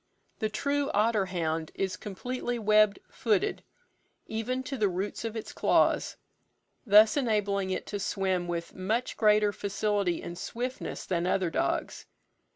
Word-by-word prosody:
The 215 - 0
true 280 +5 -1
otter 210 -2 +2
hound 165 -3 -2
is 190 -1 -1
completely 245 +4 -4
web 215 -2 +4
footed, 215 -5 0 0.6
even 240 +4 -2
to 270 - -4
the 215 -6 +2
roots 190 +5 -3
of 225 -1 -4
its 220 - -6
claws; - - +2 0.7
thus 215 +2 +7
enabling 205 -7 0
it 185 - -2
to 205 - -4
swim 190 -2 -1
with 170 -1 -4
much 220 +7 -2
greater 210 -1 +4
facility 200 -3 -1
and 175 +1 -7
swiftness 250 +6 -4
than 175 -1 -1
other 185 -2 +1
dogs. - - -2
210 Hz, 140 wpm, -29 LUFS, 190-225 Hz, 0.7 s, thus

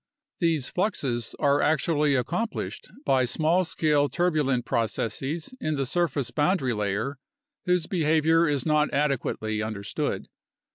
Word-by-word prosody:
These 165 -6 +1
fluxes 135 - -1
are 145 -1 +3
actually 150 -1 +2
accomplished 175 - -3 0.2
by 130 -1 +3
small 160 +8 +2
scale 150 -4 +1
turbulent 150 -8 +1
proc 115 -2 +1
esses 140 - -3
in 155 -1 -1
the 135 -1 -1
surface 145 -3 -1
boundary 145 -4 +1
layer 105 +6 -2 0.5
whose 180 -2 +2
behavior 160 -1 +3
is 140 -3 0
not 150 -1 +2
adequately 125 -6 -1
understood. 110 -2 -3
145 Hz, 125 wpm, -26 LUFS, 130-165 Hz, 0.5 s, are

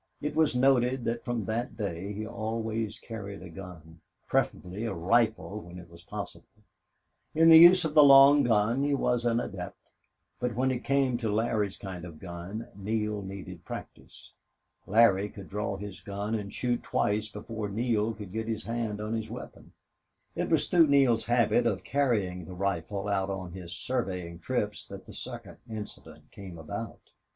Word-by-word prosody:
It 150 - -3
was 155 -4 +3
noted 125 -1 +3
that 115 0 -2
from 120 -4 -2
that 115 +4 -3
day 100 -2 -3
he 105 +1 -4
always 110 0 -3
carried 100 -4 -8
a 90 - -10
gun, 80 -3 -11 0.3
preferably 95 +5 -1
a 100 - -2
rifle 110 +3 +1
when 90 -1 -11
it 85 -1 -12
was 85 0 -14
possible. 90 - -9 0.7
In 165 +1 +6
the 160 0 +11
use 175 +1 +8
of 155 - -2
the 150 - +8
long 140 +1 +8
gun 115 +2 +2
he 145 0 +2
was 125 -3 0
an 115 0 +2
adept, 90 -5 -6 0.6
but 125 -2 -2
when 130 +2 +2
it 125 -1 -3
came 135 -3 +2
to 115 -3 -2
Larry's 105 -2 0
kind 95 -3 -7
of 85 -2 -8
a - - -14
gun 90 +6 -7
Neale 105 +1 -2
needed 95 0 -8
practice. - - -10 0.6
Larry 105 -2 +4
could 100 -2 -11
draw 100 -1 -2
his 100 -1 -8
gun 100 +2 -4
and 105 -3 -3
shoot 120 -1 -1
twice 105 +1 0
before 105 0 -5
Neale 110 0 0
could 105 -3 -9
get 110 +2 -3
his 110 -1 -2
hand 115 -3 -3
on 105 +1 -3
his 110 -1 -3
weapon. 120 +3 -9 0.6
It - - -1
was - - +2
through 170 -3 +5
Neale's 135 -5 +4
habit 120 0 +3
of - - -1
carrying 105 -11 0
the 90 - -9
rifle 100 +1 -2
out 100 -1 0
on 95 -2 -4
his 90 -1 -8
surveying 90 -7 -3
trips - - -2
that - - -9
the - - -12
second - - -8
incident 110 -2 -9
came 95 -4 -10
about. 80 -1 -7
110 Hz, 175 wpm, -29 LUFS, 95-120 Hz, 0.7 s, the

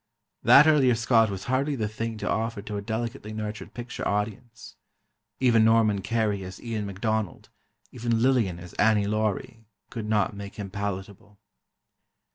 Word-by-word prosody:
That 145 - +8
earlier 140 -6 +5
Scot 115 -1 +3
was 95 -1 -5
hardly 135 +3 0
the 110 -4 -1
thing 115 +1 -4
to - - -4
offer 110 -2 -1
to 105 - -6
a 100 - -3
delicately 110 +1 -4
nurtured 105 -2 -6
picture 120 -1 -5
audience. 110 +3 -4 0.6
Even 120 -4 +4
Norman 110 -3 +3
Kerry 105 -1 -1
as 95 0 -8
Ian 110 -3 -4
MacDonald, 105 0 -3 0.4
even 120 -2 -1
Lillian 115 -8 +2
as 90 0 -11
Annie 105 -1 +4
Laurie, 110 +1 -2 0.2
could 110 -3 -5
not 105 -2 +1
make 100 0 -8
him 100 -2 -6
palatable. 100 +1 -6
110 Hz, 150 wpm, -26 LUFS, 100-115 Hz, 0.6 s, That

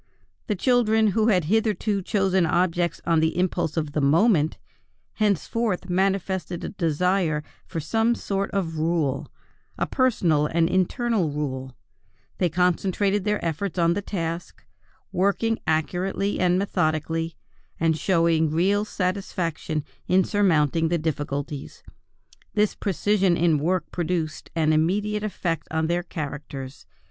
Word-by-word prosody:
The 210 - 0
children 220 -1 +3
who 215 +2 +2
had 185 -6 +3
hitherto 215 +1 +1
chosen 190 -1 +1
objects 175 +1 +1
on 165 -1 +3
the 160 +2 +1
impulse 180 -3 0
of 155 -2 -1
the 150 - -1
moment, 160 +2 +3 0.6
henceforth 210 -1 0
manifested 190 -2 0
a - - -3
desire 170 -2 0 0.2
for 165 - -4
some 225 +9 +1
sort 195 -2 -2
of 165 -5 -2
rule, 155 -4 0 0.5
a - - 0
personal 175 - +2
and 165 +1 +2
internal 185 +1 +1
rule; 130 -3 -4 0.6
they 180 - +2
concentrated 185 +4 +1
their 210 -2 0
efforts 170 +4 -2
on 170 -1 +3
their 205 - -2
task, 170 -4 -5 0.5
working 200 +4 +1
accurately 180 +5 0
and 180 0 +3
methodically, 165 -3 -1 0.4
and 165 -1 +2
showing 165 -2 +2
real 190 +6 +2
satisfaction 180 -6 -2 0.2
in 185 +1 +4
surmounting 165 -6 +2
difficulties. 150 -3 -3 0.7
This 210 -1 +2
precision 195 -2 +1
in 165 -3 +3
work 180 +5 -1
produced 170 -2 -2
an 155 -1 +2
immediate 205 +7 +1
effect 175 -7 -3
on 160 0 0
their 175 +2 0
characters. 145 -5 -7
175 Hz, 125 wpm, -24 LUFS, 160-200 Hz, 0.7 s, in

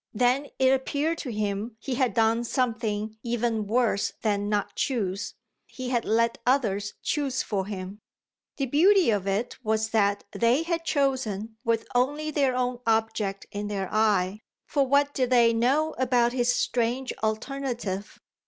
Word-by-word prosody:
Then 250 +5 +2
it 260 -1 +4
appeared 285 +5 0
to 255 - -4
him 210 +1 -3
he 265 - -4
had 250 -4 +1
done 225 +1 +3
something 220 -3 -1
even 230 -2 -1
worse 230 -2 +1
than 205 -2 0
not 210 -1 -1
choose 205 -7 -2 0.3
he 255 -1 -6
had 240 -3 0
let 230 +1 +1
others 210 -6 +1
choose 275 -3 -1
for 195 -3 -2
him. 195 0 -6 0.6
The 275 - 0
beauty 345 - +4
of 200 -2 -1
it 200 +5 -2
was 220 0 0
that 205 -2 +2
they 240 +6 +2
had 335 0 -2
chosen 230 -8 -1
with 230 -2 0
only 290 +5 +1
their 275 -4 +1
own 250 -1 -1
object 220 -3 0
in 205 0 -4
their 195 -2 -3
eye, 210 -2 +2 0.3
for 280 -2 +1
what 285 +1 +3
did 255 -2 0
they 235 -2 +5
know 270 +7 +2
about 245 -2 +2
his 245 -1 +2
strange 245 +2 0
alternative? 220 -3 -3
235 Hz, 155 wpm, -26 LUFS, 210-260 Hz, 0.6 s, they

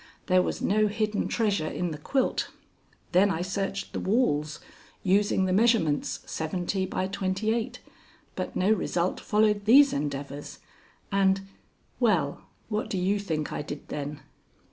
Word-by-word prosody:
There 185 -1 +4
was - - -3
no 215 +2 +3
hidden 215 0 -1
treasure 205 -8 0
in 175 +2 -2
the 150 - -6
quilt. 260 - 0 0.6
Then 190 +3 +5
I 170 -2 -1
searched 195 +1 -3
the - - -2
walls, 155 - +1 0.4
using 195 0 +3
the 185 - +1
measurements 205 - +2
seventy 180 +4 -2
by 185 - -1
twenty 190 +3 -1
eight, 235 +2 -3 0.5
but - - -4
no 190 +3 +2
result 180 -3 0
followed 210 -1 +2
these 275 +5 +7
endeavors, 145 0 -4 0.5
and 195 -1 +3 0.6
well, 180 - +2 0.3
what 215 0 -2
do 195 - -2
you 195 +3 +1
think 160 -6 -3
I - - -2
did 145 -1 -8
then?" 145 0 -5
190 Hz, 145 wpm, -27 LUFS, 160-210 Hz, 0.6 s, these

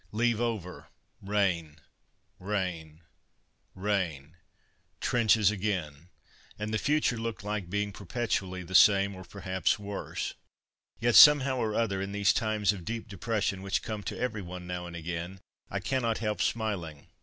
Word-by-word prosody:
Leave 115 +1 +1
over; 110 -7 -3 0.3
rain, 95 -6 0 0.6
rain, 90 -5 -3 0.7
rain; 90 -7 -2 0.6
trenches 110 -4 +3
again, 90 -7 -3 0.5
and 105 +1 -4
the 110 - +1
future 145 -4 +1
looked 115 -2 -4
like 105 -4 -3
being 105 +1 -1
perpetually 100 -3 -3
the 90 +1 -10
same, 100 +1 +6
or 95 - -9
perhaps 95 +1 -1
worse. 100 -1 -5 0.7
Yet, 120 +1 +2
somehow 140 -2 +8
or 110 -3 -1
other, 100 -5 0
in 100 +1 -4
these 100 +1 +3
times 105 -2 +1
of 95 -4 -8
deep 115 +4 -5
depression 100 0 -2
which 95 0 -1
come 110 -2 -4
to - - -4
every 115 -4 -2
one 90 0 -8
now 90 0 -5
and 85 - -9
again, 85 +3 -5 0.3
I - - -2
cannot 120 -4 0
help 105 -1 -2
smiling. 90 -10 -2
100 Hz, 145 wpm, -29 LUFS, 90-110 Hz, 0.7 s, somehow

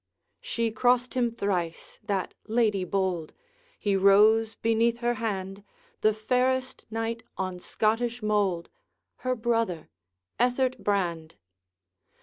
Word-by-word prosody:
She 230 -1 -2
crossed 245 +2 +2
him 245 -2 +2
thrice, 185 -7 -3
that 195 -3 -2
lady 215 -4 +2
bold; 185 -3 -1 0.4
He 200 -2 0
rose 215 +3 +5
beneath 230 +1 +2
her 240 0 0
hand 195 -2 -3 0.4
The 215 - +5
fairest 255 +4 0
knight 225 +1 -3 0.2
on 185 -1 -3
Scottish 230 +4 -1
mould, 200 -5 0 0.5
Her 255 0 -1
brother, 225 -8 -1 0.5
Ethert 250 +1 +1
Brand! 175 -6 -1
220 Hz, 110 wpm, -27 LUFS, 195-235 Hz, 0.5 s, rose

